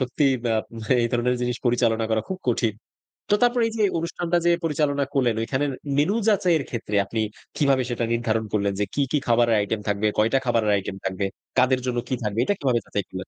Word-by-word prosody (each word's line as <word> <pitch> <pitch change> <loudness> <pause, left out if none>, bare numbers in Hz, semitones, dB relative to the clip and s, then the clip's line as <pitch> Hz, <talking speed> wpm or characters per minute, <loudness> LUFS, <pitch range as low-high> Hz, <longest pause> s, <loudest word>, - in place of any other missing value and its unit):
সত্যিই 135 +1 +2 0.2
আ - - +2 0.5
এই 115 - +2
ধরনের 125 +1 +1
জিনিস 125 -1 -1
পরিচালনা 115 -2 +2
করা 110 -1 +1
খুব 190 - -4
কঠিন। 115 -2 +1 0.6
তো 205 - +5
তারপর 245 0 +3
এই - - -4
যে, 215 - +2
অনুষ্ঠানটা 170 +1 -1
যে 175 - +5
পরিচালনা 145 -3 +1
করলেন, 125 -5 +2
ওইখানের 135 +5 -1 0.3
মেন্যু 160 +9 +2
যাচাইয়ের 180 -8 +3
ক্ষেত্রে 110 -3 -4
আপনি 110 +3 -2 0.4
কিভাবে 135 -3 +3
সেটা 120 -1 -1
নির্ধারণ 115 -1 0
করলেন 100 -1 +1
যে, 105 - +2
কী, 145 - 0
কী 150 - +3
খাবারের 115 -1 +4
আইটেম 105 +1 -1
থাকবে? 105 +1 +1
কয়টা 115 +5 +3
খাবারের 115 -3 +2
আইটেম 95 -1 -3
থাকবে? 95 +1 -1 0.3
কাদের 130 0 +4
জন্য 125 -1 -1
কী 130 - +1
থাকবে? 105 +1 -2
এটা 205 - +1
কিভাবে 125 -4 +1
যাচাই 100 -2 -3
করলেন? 95 0 -7
120 Hz, 200 wpm, -24 LUFS, 110-145 Hz, 0.6 s, তো